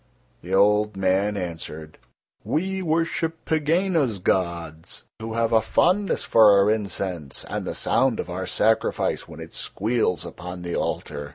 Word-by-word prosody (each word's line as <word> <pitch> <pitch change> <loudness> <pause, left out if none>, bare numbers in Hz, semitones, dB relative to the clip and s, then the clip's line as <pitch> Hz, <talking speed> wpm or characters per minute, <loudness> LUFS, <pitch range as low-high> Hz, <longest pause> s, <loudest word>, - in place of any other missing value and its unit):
The 90 +3 -2
old 105 +1 +3
man 95 +2 +1
answered: 80 -3 -6 0.4
"We 190 +4 -1
worship 165 -1 -1
Pegāna's 160 - +1
gods, 85 -3 -2 0.2
who 110 0 -5
have 115 0 +1
a 110 - +5
fondness 185 - +1
for 110 -2 +6
our 100 +1 +4
incense 95 -8 -3
and - - -4
the - - -3
sound 130 -3 +1
of - - -3
our 90 +1 -4
sacrifice 110 +4 +1
when - - -11
it - - -9
squeals 110 -4 -1
upon 90 0 -8
the 85 -1 -3
altar." 75 -1 -3
105 Hz, 145 wpm, -24 LUFS, 90-135 Hz, 0.4 s, for